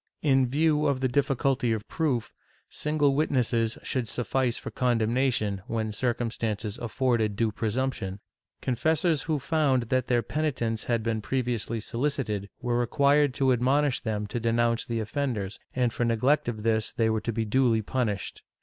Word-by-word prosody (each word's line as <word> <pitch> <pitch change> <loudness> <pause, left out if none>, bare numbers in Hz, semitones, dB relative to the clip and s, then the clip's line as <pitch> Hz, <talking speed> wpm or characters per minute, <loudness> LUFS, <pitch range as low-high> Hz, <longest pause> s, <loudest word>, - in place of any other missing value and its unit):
In 135 -3 +4
view 150 +2 +2
of 140 -2 +1
the 130 - +1
difficulty 135 -1 +1
of 110 -2 -4
proof, 135 -8 -1 0.4
single 150 -2 +1
witnesses 120 -6 +1
should 125 -3 -2
suffice 125 +1 -1
for - - -7
condemnation, 115 -4 +1
when 110 -1 -2
circumstances 115 -2 -2
afforded 120 -3 0
due 110 +1 +1
presumption. 110 -3 -2 0.4
Confessors, 155 +5 +1
who 155 0 -1
found 140 -5 +1
that 130 -1 +1
their 120 -2 +2
penitents 120 -6 -1
had 115 -2 0
been 115 -1 -1
previously 120 -2 -2
solicited, 115 -4 -2
were 120 -1 +1
required 140 +3 +3
to 135 -2 +3
admonish 135 +3 +2
them 105 -2 -2
to 110 +4 -3
denounce 115 0 +1
the 115 -1 -2
offenders, 110 -3 -3 0.2
and 125 -2 +1
for - - -1
neglect 120 +6 +2
of 110 -3 -5
this 110 -1 +1
they 115 - +1
were 110 -1 0
to 115 - -2
be 115 0 -1
duly 115 -1 +2
punished. 105 -5 -2
120 Hz, 155 wpm, -27 LUFS, 110-135 Hz, 0.4 s, In